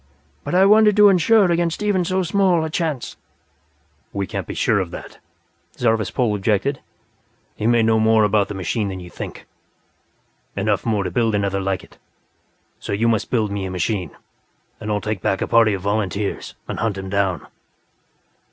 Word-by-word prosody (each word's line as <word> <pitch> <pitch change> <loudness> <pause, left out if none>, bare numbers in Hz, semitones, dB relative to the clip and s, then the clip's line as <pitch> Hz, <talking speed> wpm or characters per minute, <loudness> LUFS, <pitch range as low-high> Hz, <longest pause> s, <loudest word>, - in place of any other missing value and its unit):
But - - -3
I 190 +1 +6
wanted 210 0 +5
to 210 -1 +8
insure 195 +1 +4
against 170 +2 0
even 200 -3 +1
so 185 +1 0
small 180 -2 +2
a 160 - -5
chance." 155 -6 -3 0.9
"We 100 -1 -2
can't - - -5
be - - -6
sure - - +2
of - - -2
that," - - -10 0.6
Zarvas 115 -3 +1
Pol 120 -5 0
objected. 105 +7 0 0.7
"He 110 - -2
may 120 -1 +4
know 110 0 +3
more 110 0 +4
about 105 -1 +2
the 105 - -6
machine 95 +4 -2
than 95 -1 -5
you 90 -1 -11
think; - - -8 1.1
enough - - -1
more 105 -3 +1
to - - -4
build 115 -3 +1
another 100 -1 0
like 95 -1 -2
it. - - -19 0.8
So - - -5
you 110 +4 +1
must 110 -3 0
build 110 -4 0
me 100 -1 -3
a - - -4
machine 90 0 -2 0.7
and 110 -1 -4
I'll 105 -1 0
take 105 -3 -3
back 95 - 0
a - - -1
party 115 -3 +4
of 95 - -8
volunteers 100 0 -2
and - - -5
hunt 110 -3 -1
him 95 0 -6
down." 95 -4 -1
110 Hz, 180 wpm, -21 LUFS, 100-160 Hz, 1.1 s, to